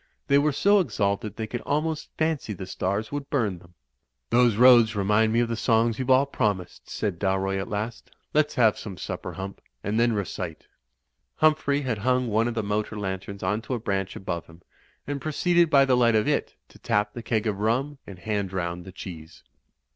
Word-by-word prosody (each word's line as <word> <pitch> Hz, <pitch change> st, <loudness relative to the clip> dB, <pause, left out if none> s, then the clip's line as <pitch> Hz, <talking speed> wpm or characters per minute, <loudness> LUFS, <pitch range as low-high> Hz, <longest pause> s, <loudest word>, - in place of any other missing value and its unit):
They 140 Hz, 0 st, +4 dB
were 150 Hz, +1 st, +2 dB
so 200 Hz, +8 st, +4 dB
exalted 105 Hz, -, -1 dB
they 110 Hz, -, -3 dB
could 120 Hz, +2 st, -5 dB
almost 155 Hz, +1 st, -2 dB
fancy 155 Hz, -8 st, -1 dB
the 95 Hz, 0 st, -7 dB
stars 100 Hz, +3 st, -2 dB
would 145 Hz, -1 st, -5 dB
bum 105 Hz, -10 st, 0 dB
them. 85 Hz, 0 st, -20 dB, 0.6 s
''Those 120 Hz, -2 st, +4 dB
roads 120 Hz, -2 st, +7 dB
remind 105 Hz, +2 st, +2 dB
me 115 Hz, +1 st, +3 dB
of 120 Hz, -, +1 dB
the 115 Hz, -, -2 dB
songs 115 Hz, 0 st, +2 dB
youVe 130 Hz, 0 st, -3 dB
all 130 Hz, +2 st, +5 dB
promised," 105 Hz, -9 st, -2 dB
said 95 Hz, -5 st, -3 dB
Dalroy 95 Hz, 0 st, 0 dB
at 95 Hz, -, -4 dB
last. 110 Hz, +3 st, -4 dB, 0.2 s
"Let's 150 Hz, 0 st, +2 dB
have 115 Hz, -5 st, +3 dB
some 100 Hz, -4 st, -7 dB
supper. -, -, -5 dB
Hump, 95 Hz, +1 st, -7 dB, 0.2 s
and 105 Hz, +3 st, 0 dB
then 120 Hz, 0 st, +3 dB
recite." 90 Hz, -5 st, -4 dB, 0.7 s
Humphrey 155 Hz, -2 st, +2 dB
had 125 Hz, -6 st, -2 dB
hung 125 Hz, +2 st, +1 dB
one 110 Hz, +2 st, +2 dB
of 120 Hz, -, -3 dB
the 110 Hz, -, -1 dB
motor 105 Hz, +1 st, -2 dB
lanterns 95 Hz, 0 st, -5 dB
onto 105 Hz, +7 st, -1 dB
a -, -, -3 dB
branch 95 Hz, -3 st, -2 dB
above 85 Hz, -3 st, -4 dB
him, 85 Hz, +1 st, -17 dB, 0.4 s
and 140 Hz, -1 st, -4 dB
proceeded 170 Hz, +2 st, +2 dB
by 140 Hz, -2 st, +6 dB
the 130 Hz, -2 st, +3 dB
light 120 Hz, -2 st, +4 dB
of 105 Hz, -1 st, +2 dB
it -, -, 0 dB
to -, -, -18 dB
tap 105 Hz, 0 st, 0 dB
the 120 Hz, -, -6 dB
keg 115 Hz, -1 st, -1 dB
of 105 Hz, -3 st, -1 dB
rum 130 Hz, +7 st, 0 dB
and 95 Hz, -, -9 dB
hand 100 Hz, 0 st, -2 dB
round 85 Hz, -1 st, -3 dB
the 95 Hz, -, -9 dB
cheese. 85 Hz, -4 st, -10 dB
110 Hz, 200 wpm, -26 LUFS, 100-130 Hz, 0.7 s, roads